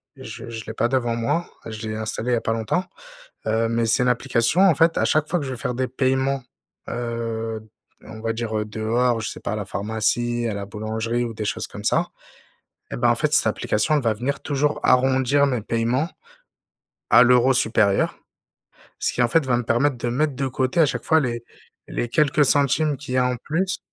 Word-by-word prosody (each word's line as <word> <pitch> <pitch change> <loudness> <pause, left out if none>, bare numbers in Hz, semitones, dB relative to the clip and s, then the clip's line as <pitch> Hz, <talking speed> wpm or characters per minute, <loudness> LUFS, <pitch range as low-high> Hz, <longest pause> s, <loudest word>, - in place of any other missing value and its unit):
je - - -9
je 110 -1 -7
l'ai 110 - -6
pas 115 - +1
devant 120 -2 0
moi. 120 +9 -1 0.2
Je 110 0 -6
l'ai 110 - -3
installé 110 +2 -3
il - - +3
y - - +4
a - - -2
pas 115 - -1
longtemps, 115 - -1 0.6
heu 110 +1 +1
mais 115 0 0
c'est 115 - +2
une - - +1
application 125 +5 +1
en 190 -5 +6
fait 165 +2 +3
à - - +2
chaque 155 0 +1
fois 175 0 0
que - - -4
je 135 - -5
vais 130 - -4
faire 125 -1 -3
des 130 +1 -1
paiements, 130 +1 0 0.5
heu, 115 -2 -3 0.4
on 110 0 -10
va 115 0 -1
dire, 115 -1 -3
heu, 105 - -1
dehors, 115 +3 0
je 110 - -3
sais - - -9
pas - - -4
à 110 - -2
la 105 - -3
pharmacie, 110 +4 -1
à 105 - -2
la 100 -1 -5
boulangerie 110 +3 -2
ou 115 - -5
des 110 - -4
choses - - -2
comme - - -10
ça - - +1 0.8
et - - -3
ben, - - +3
en - - +3
fait, - - 0
cette - - +4
application 105 +8 0
elle 150 - +2
va 115 -2 +2
venir 135 +6 -3
toujours 145 +1 0
arrondir 130 +2 +3
mes 125 -5 -1
paiements 115 +8 0 1.0
à - - +8
l'euro 125 +2 +5
supérieur. 110 -5 +2 0.8
Ce - - -1
qui, 120 - 0
en 120 - +3
fait, 160 +5 +3
va 125 -2 +1
me 120 - -2
permettre 125 +4 +1
de 120 - -2
mettre 140 +4 0
de 135 +1 -2
côté 130 +5 0
à 155 - +6
chaque 125 -2 -3
fois 160 0 +4
les 120 -4 -2 0.5
les 120 - -3
quelques 150 +3 +3
centimes 145 +2 +2
qu'il 135 -1 -7
y - - +2
a 125 - +3
en 125 0 -1
plus 175 +8 -2
120 Hz, 225 wpm, -23 LUFS, 115-135 Hz, 1.0 s, à